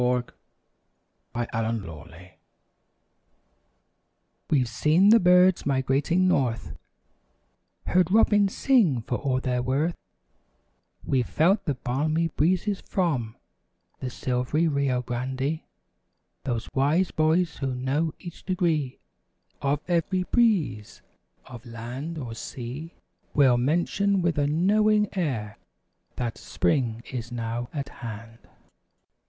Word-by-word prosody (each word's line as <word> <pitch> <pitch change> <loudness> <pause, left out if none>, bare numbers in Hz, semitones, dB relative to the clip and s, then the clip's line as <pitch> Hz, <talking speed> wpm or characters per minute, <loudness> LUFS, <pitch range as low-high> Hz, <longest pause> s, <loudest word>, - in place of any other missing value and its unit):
THE 125 0 0 1.1
SIGN 115 -2 -2
OF 80 -2 -10
SPRING 90 +3 -14 2.2
We've 130 -5 +2
seen 155 - +3
the 230 +1 +8
birds 180 0 +5
migrating 140 +7 +2
north; 130 -10 0 1.1
Heard 180 -2 +2
robins 205 -1 +4
sing 190 - +3
for 120 - -2
all 130 -3 0
they're 125 -1 -1
worth; 140 +7 0 1.1
We've 130 -2 0
felt 190 +6 +2
the 145 -5 0
balmy 155 +7 0
breezes 185 +6 0
from 130 - -1 0.6
The 130 - -4
"Silv'ry 125 +5 -1
Rio 140 -4 0
Grande." 130 +5 -2 0.9
Those 120 -4 -2
wise 155 +7 +2
boys 160 +2 +1
who 135 -2 -2
know 140 +6 0
each 175 -2 -10
degree 165 -8 0 0.6
Of 140 +1 0
every 180 +2 +1
breeze 185 - 0 0.4
of 120 -2 -11
land 125 +7 -6
or 125 -6 -5
sea, 130 +7 -7 0.4
Will 130 -4 +5
mention 175 +7 +1
with 170 -3 +1
a 145 - +2
knowing 210 +7 +2
air. 120 - -2 0.6
That, 120 -2 -3
"Spring 120 -6 0
is 120 -1 -5
now 120 0 -3
at 140 -2 -4
hand." 115 0 -8
140 Hz, 110 wpm, -26 LUFS, 125-175 Hz, 2.2 s, the